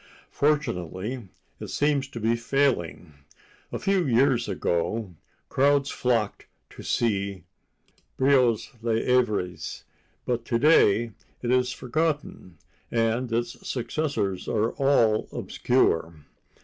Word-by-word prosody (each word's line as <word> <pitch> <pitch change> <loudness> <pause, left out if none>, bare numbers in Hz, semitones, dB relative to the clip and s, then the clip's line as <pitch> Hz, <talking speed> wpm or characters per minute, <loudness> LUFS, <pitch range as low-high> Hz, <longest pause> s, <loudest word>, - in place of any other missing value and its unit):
Fortunately, 120 - -1 0.3
it - - -6
seems 145 -2 +1
to 120 - -8
be 115 +1 +2
failing. 115 - 0 0.6
A - - -2
few 195 -2 +1
years 120 -1 +3
ago, 95 +2 -1 0.3
crowds 140 +1 +2
flocked 115 -4 -1 0.2
to - - -11
see 100 -5 -1 0.7
Brieux's 130 -4 +3
"Les 115 -1 0
Avariés," 110 -8 0 0.4
but 120 -1 -1
to 120 -1 0
day 115 -5 +4 0.3
it 120 - 0
is 125 0 +2
forgotten, 145 - -3 0.3
and 115 +1 0
its 120 +1 -3
successors 125 -7 -2
are 110 +1 +1
all 120 -6 +2
obscure. 85 -9 +1
120 Hz, 105 wpm, -26 LUFS, 105-135 Hz, 0.7 s, day